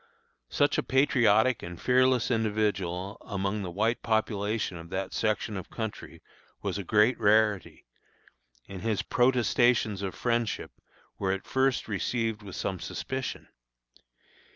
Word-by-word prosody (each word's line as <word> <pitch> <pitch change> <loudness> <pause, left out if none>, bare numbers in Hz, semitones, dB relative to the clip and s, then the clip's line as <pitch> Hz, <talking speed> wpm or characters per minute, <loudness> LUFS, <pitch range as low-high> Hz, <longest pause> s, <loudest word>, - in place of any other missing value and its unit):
Such - - +2
a - - +2
patriotic 130 -4 +3
and 85 0 -8
fearless 130 0 +3
individual 105 -4 -1
among 100 +1 -2
the 95 - -4
white 110 +6 0
population 110 -3 -1
of 85 0 -10
that 95 +1 -3
section 110 -1 -1
of 95 - -6
country 110 -2 -6 0.4
was - - -2
a - - -4
great 105 +6 +3
rarity, 105 -2 +2 0.8
and 95 -2 -8
his 110 -3 -1
protestations 120 -4 +2
of 95 -2 -4
friendship 120 -2 -1 0.5
were 95 -1 0
at 95 0 -3
first 130 -1 +1
received 110 +1 -1
with 100 -3 -9
some 95 -2 -3
suspicion. 130 +9 -5
110 Hz, 130 wpm, -28 LUFS, 100-120 Hz, 0.8 s, patriotic